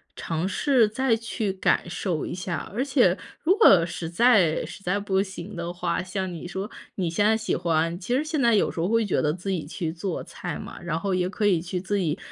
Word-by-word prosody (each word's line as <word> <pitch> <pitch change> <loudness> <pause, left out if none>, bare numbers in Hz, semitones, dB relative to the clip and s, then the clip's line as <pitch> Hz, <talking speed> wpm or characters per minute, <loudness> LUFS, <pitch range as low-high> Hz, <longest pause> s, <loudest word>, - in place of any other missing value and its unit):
尝 165 +2 -2
试 250 +2 +3
再 250 +2 +1
去 220 -3 -3
感 190 - +1
受 175 -3 -2
一 - - -5
下。 180 -3 -4
而 240 +5 0
且 255 -10 +3 0.3
如 365 +4 +4
果 195 - +7
实 170 -1 -5
在 185 -4 +4
实 - - -10
在 180 +2 0
不 195 -1 +1
行 195 0 -7
的 170 0 -4
话， 175 -1 -2
像 185 0 -3
你 170 +1 -7
说 190 +3 -4 0.3
你 180 -4 -1
现 185 +5 +1
在 220 +1 +4
喜 220 - -1
欢 165 0 0
其 205 +7 -1
实 275 - +1
现 310 -2 -1
在 235 -3 +4
有 205 - +2
时 - - -7
候 170 - +1
会 230 +1 +2
觉 205 - +1
得 150 - +2
自 185 +3 -4
己 170 -6 -2
去 160 +1 -3
做 175 +1 -4
菜 - - -6
嘛， - - -9
然 165 -2 -2
后 195 +2 -1
也 180 0 +1
可 205 +2 -2
以 185 -5 +3
去 180 +1 -3
自 195 +3 -1
己 165 -3 0
190 Hz, 255 characters per minute, -25 LUFS, 170-215 Hz, 0.3 s, 果